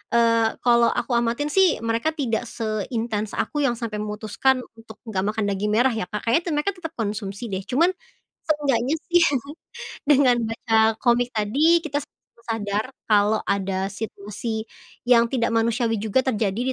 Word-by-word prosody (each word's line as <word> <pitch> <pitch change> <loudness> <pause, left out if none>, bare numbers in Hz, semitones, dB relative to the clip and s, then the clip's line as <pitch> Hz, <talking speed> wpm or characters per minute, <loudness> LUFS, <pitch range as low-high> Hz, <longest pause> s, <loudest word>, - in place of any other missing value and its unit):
eee, 230 -1 +3
kalau 235 -1 +5
aku - - -2
amatin 240 +6 -1
sih, 380 -4 +4
mereka 230 +8 0
tidak 240 -4 -1
seintens 220 -1 -3
aku, 295 - -2
yang 240 - 0
sampai 225 -3 -4
memutuskan 215 +5 0 0.2
untuk 220 -1 -13
nggak 195 -5 -2
makan 220 - 0
daging 205 +2 -1
merah 250 +3 +4
ya, 220 -5 -3
Kak. 210 - -5
Kayaknya 235 +9 +2
tuh, 320 - 0
mereka 300 +7 0
tetap 325 -2 -6
konsumsi 205 -1 -4
deh, 190 0 -3
cuman 330 +8 +3 0.6
seenggaknya 285 -2 +1 0.2
sih, 350 0 +6 0.9
dengan 265 -4 +5
baca 225 0 -2 0.3
komik 245 0 +2
tadi, 285 +11 +3
kita 290 -1 -1 0.5
sadar 220 +2 -2 0.2
kalau 210 +1 +3
ada 195 -1 -1
situasi 215 +2 -5 0.5
yang 235 -1 +6
tidak 235 -3 +1
manusiawi 225 0 +1
juga, 220 +5 +1
terjadi 210 -3 0
230 Hz, 150 wpm, -23 LUFS, 210-255 Hz, 0.9 s, sih